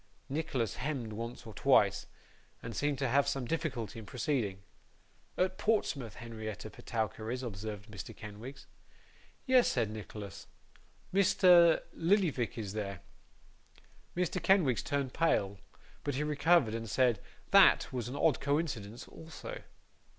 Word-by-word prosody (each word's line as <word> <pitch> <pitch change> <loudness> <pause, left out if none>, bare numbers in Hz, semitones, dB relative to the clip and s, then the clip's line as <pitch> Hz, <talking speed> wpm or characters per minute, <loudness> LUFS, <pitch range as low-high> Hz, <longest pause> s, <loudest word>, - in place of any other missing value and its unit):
Nicholas 135 - -2
hemmed 130 -5 -3
once 115 +3 -6
or 110 - -9
twice, - - +3 0.6
and 115 0 -6
seemed 145 -1 0
to 135 0 0
have 140 +3 +3
some 135 -2 -1
difficulty 125 -7 -3
in 110 - -9
proceeding. 110 -5 -2 0.7
'At 185 +1 0
Portsmouth, 145 - 0
Henrietta 110 -3 -7
Petowker 110 -1 -3
is,' 125 +2 -3
observed 105 -2 -6
Mr. 105 -3 -8
Kenwigs. 110 +6 -9 0.8
'Yes,' 255 -2 +5
said 115 -4 0
Nicholas, 105 -1 -8 0.7
'Mr. 180 -3 +6
Lillyvick 165 - +1
is 105 -3 -4
there.' 100 -4 -4 1.2
Mr. 180 -1 0
Kenwigs 175 - +3
turned 140 -3 -2
pale, 100 - +1 0.4
but 145 - -2
he 145 - 0
recovered, 150 -4 +3
and 115 -1 -4
said, 120 -2 +3 0.3
THAT - - +6
was 120 -3 -2
an 125 - -5
odd 155 -2 +2
coincidence 135 -7 -2
also. 160 -1 -9
125 Hz, 130 wpm, -32 LUFS, 110-155 Hz, 1.2 s, Mr